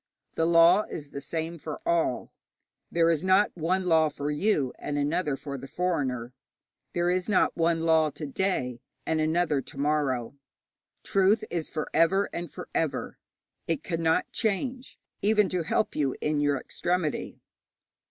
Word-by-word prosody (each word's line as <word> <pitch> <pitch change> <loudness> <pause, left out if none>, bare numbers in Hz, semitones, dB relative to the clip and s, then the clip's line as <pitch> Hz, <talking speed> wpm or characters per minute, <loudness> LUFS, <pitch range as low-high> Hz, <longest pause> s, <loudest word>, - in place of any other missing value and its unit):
The 165 - +1
law 170 +3 +6
is 145 -3 -7
the 140 - -6
same 165 +3 -4
for 155 0 -6
all. 165 -7 0 0.6
There 170 0 +3
is 165 0 0
not 190 +2 +3
one 180 +3 0
law 160 -3 +4
for 145 0 -4
you 150 -5 +1
and 145 - -3
another 150 +1 0
for 140 -1 -6
the 135 - -9
foreigner; 130 -9 -2 0.6
there 175 0 +1
is 185 +2 -1
not 200 - +3
one 165 0 +1
law 160 -1 +4
to 150 - -7
day 135 -7 -1 0.2
and 160 -1 0
another 155 -2 +1
to 135 - -13
morrow. 140 -4 0 0.7
Truth 200 +3 +3
is 170 -3 -2
for 155 - -3
ever 190 +5 +3
and 170 -2 -5
for - - -8
ever. 145 -5 -2 0.5
It 160 -3 -1
cannot 165 -2 0
change 250 +4 -2 0.2
even 210 -1 +3
to 180 -2 -1
help 165 +6 0
you 140 -3 0
in 150 -1 0
your 145 -1 +2
extremity. 175 -1 -2
165 Hz, 155 wpm, -27 LUFS, 145-180 Hz, 0.7 s, law